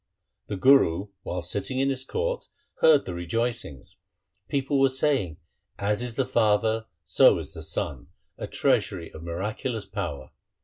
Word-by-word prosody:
The 100 - -3
Guru 100 -6 +4
while 90 0 -4
sitting 100 +8 -3
in 135 +1 +2
his 130 -1 -3
court - - -2 0.3
heard 155 -3 +6
the 90 - -4
rejoicings. 85 - -3 0.5
People 140 0 0
were 135 0 +5
saying, 130 - 0 0.2
' - - -46
As 105 - +1
is 120 -2 -3
the 135 - +1
father, 110 -2 +2 0.2
so - - +5
is - - -7
the - - -8
son, 65 -4 -3 0.3
a - - -6
treasury 85 -3 0
of 80 - -10
miraculous 105 +7 -3
power.' 70 -2 -5
110 Hz, 150 wpm, -26 LUFS, 90-135 Hz, 0.5 s, heard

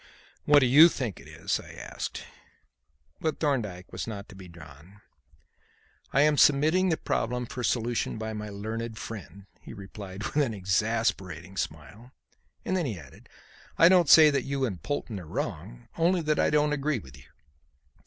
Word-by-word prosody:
"What 145 -1 +6
do - - +4
you 150 +7 +8
think 125 - -4
it - - -14
is?" - - -2
I - - -12
asked. - - -6 1.0
But 155 -2 -2
Thorndyke 110 - -2
was - - -5
not 100 -3 -6
to 100 - -12
be 95 -1 -11
drawn. 85 +3 -15 1.1
"I 140 - +3
am 150 0 +3
submitting 155 +6 +4
the 160 - +1
problem 125 +2 -2
for 125 +1 -6
solution 120 0 -1
by 110 0 -4
my 105 0 -6
learned 110 +2 -5
friend," 100 -3 -9 0.2
he - - -11
replied 100 0 -9
with 145 - -4
an 135 -7 +1
exasperating 95 -3 -1
smile, 95 - -6 0.5
and 185 - 0
then 175 -5 0
added: 90 - -9 0.5
"I 165 - +7
don't 180 -5 +4
say 155 -2 +9
that 140 -1 +1
you 135 0 -2
and 95 - -5
Polton 115 - -4
are 85 - -11
wrong; - - -5
only 170 +2 +2
that 155 -1 0
I - - +3
don't 150 0 +2
agree 145 0 0
with 65 - -11
you. 65 - -17
115 Hz, 170 wpm, -27 LUFS, 95-145 Hz, 1.1 s, say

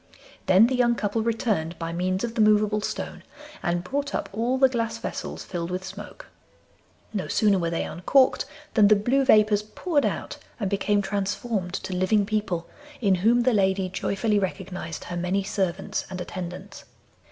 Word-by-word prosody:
Then 190 +3 +7
the 250 - 0
young 240 -1 +3
couple 210 0 -1
returned 215 -8 -1
by 165 0 -4
means 185 +3 -1
of 235 -1 -2
the 230 - +1
movable 210 0 +3
stone, - - -4 0.4
and 175 0 -1
brought 280 +8 -2
up - - -3
all 235 +5 0
the 265 0 +6
glass 230 -3 -2
vessels - - -5
filled 170 -1 -4
with 180 +1 -3
smoke. 210 - -9 0.9
No 195 -3 -2
sooner 205 -3 +3
were 170 -1 0
they 165 - -1
uncorked 255 - +2 0.3
than 210 -3 +6
the 215 - +6
blue 245 +7 +2
vapours 215 -4 +5
poured 290 +8 -1
out - - -4 0.2
and 200 -3 -2
became 205 0 +1
transformed 200 -1 -2
to 190 - -4
living 195 +3 +2
people, 205 -5 -1 0.3
in 200 -5 +3
whom 225 +7 +3
the 250 +1 +3
lady 190 -2 +2
joyfully 205 +3 0
recognised 185 -4 -4
her 175 - -6
many 180 +3 0
servants 190 -1 -2
and 185 -1 -6
attendants. 180 +2 -7
200 Hz, 170 wpm, -25 LUFS, 185-225 Hz, 0.9 s, Then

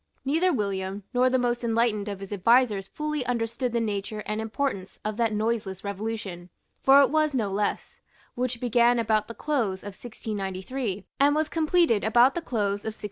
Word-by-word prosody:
Neither 325 +7 +2
William 200 - -2
nor 250 +1 +4
the 260 - +2
most 245 -1 0
enlightened 225 -2 +1
of 200 -1 -6
his 195 +1 -6
advisers 210 0 +3
fully 300 +1 -3
understood 235 +1 -1
the 235 - 0
nature 210 -1 -3
and 215 +1 -2
importance 220 -4 -3
of 215 0 -2
that 230 -2 +1
noiseless 215 -3 -2
revolution, 200 -3 -5 0.3
for 275 +1 +7
it 265 - +1
was 310 -2 +2
no 215 -6 0
less, 205 +1 -2 0.3
which 250 -1 -2
began 240 0 +3
about 215 -2 +1
the 230 - -8
close 235 -11 -1
of 205 -1 -7
1693, 205 0 -5
and 285 +1 +4
was 310 0 0
completed 325 - +2
about 240 +4 +5
the 345 - -3
close 205 -8 -1
of 220 0 -5
1696. - - -14
225 Hz, 180 wpm, -26 LUFS, 205-255 Hz, 0.3 s, for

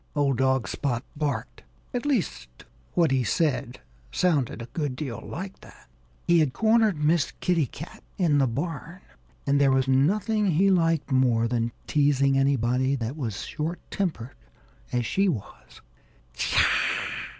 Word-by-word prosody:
old 140 -2 +2
dog 130 -2 +2
Spot 125 -4 -2
barked. 150 -1 -3 0.3
At 245 +3 -2
least, 180 - -2 0.3
what 165 -5 +3
he 130 -2 +2
said 140 -4 0 0.3
sounded 150 -11 +1
a 115 - -6
good 145 -6 -2
deal 125 -6 -5
like 190 +2 -7
that. - - -16 0.4
He 170 -1 +4
had 150 -5 +2
cornered 220 -4 +3
Miss 155 0 +2
Kitty 165 -6 +1
Cat 160 +8 -10 0.2
in 160 -6 +3
the 135 - +3
barn. 165 +7 -5 0.4
And 140 +1 +2
there 140 - +5
was 130 0 +2
nothing 205 - +2
he 190 +3 +3
liked 165 -5 +1
more 125 -3 +3
than 115 -1 -1
teasing 140 -2 +2
anybody 130 -1 +2
that 120 +1 -4
was 115 -10 -4
short 160 +3 -4
tempered 155 - -3 0.6
as 120 -1 0
she 195 - +2
was. 120 - -7
145 Hz, 140 wpm, -26 LUFS, 130-170 Hz, 0.6 s, there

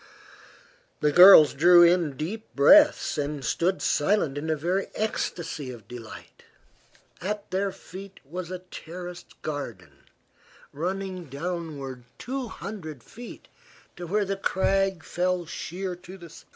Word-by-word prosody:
The 150 - +3
girls 175 -2 +9
drew 175 +4 +7
in 170 -5 +3
deep 205 +10 -5
breaths 290 - +5
and 145 -2 -3
stood 185 +8 0
silent 155 -3 +1
in 150 +2 -4
a 160 - +2
very 180 +6 -1
ecstacy 165 -9 -3
of 120 -4 -10
delight. 115 -3 -11 0.8
At 210 +2 -4
their 195 +1 0
feet 190 +2 -11
was 175 +3 -6
a 185 - -4
terraced 175 +1 -9
garden, 110 - -7 0.7
running 185 +3 -4
downward 140 -4 -6
two 260 0 -4
hundred 170 - -8
feet 235 - -11 0.5
to 175 0 -7
where 205 +4 +1
the 195 0 -3
crag 195 -2 0
fell 180 0 -1
sheer 180 +3 -5
to 180 +2 -12
the 170 -3 -13
sea. - - -14
175 Hz, 130 wpm, -26 LUFS, 150-195 Hz, 0.8 s, girls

